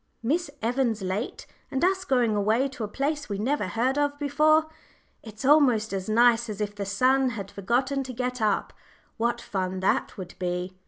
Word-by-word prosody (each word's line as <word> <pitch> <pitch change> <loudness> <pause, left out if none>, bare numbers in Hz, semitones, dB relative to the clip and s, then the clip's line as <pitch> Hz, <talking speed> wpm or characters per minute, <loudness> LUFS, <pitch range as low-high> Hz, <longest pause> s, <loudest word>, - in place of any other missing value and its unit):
"Miss 315 +7 0
Evans 235 -3 0
late 190 +5 -3 0.2
and 270 +5 +1
us 380 0 +1
going 245 -7 +2
away 220 +6 +2
to 260 -4 -7
a - - -2
place 285 +5 -2
we 200 - -2
never 255 +3 0
heard 250 +8 0
of 290 0 0
before! 305 +2 +3 0.6
It's 220 +2 -9
almost 255 -8 +4
as 190 +1 -3
nice 235 +1 +4
as 210 -1 -5
if 205 -1 -2
the 200 -1 -5
sun 255 +6 +3
had 200 -5 -6
forgotten 255 +7 0
to 255 - -6
get 250 0 -3
up 210 -2 0 0.4
what 235 +1 0
fun 185 -4 -3
that 190 - 0
would 185 -3 -7
be!" 180 0 -3
235 Hz, 180 wpm, -26 LUFS, 205-270 Hz, 0.6 s, almost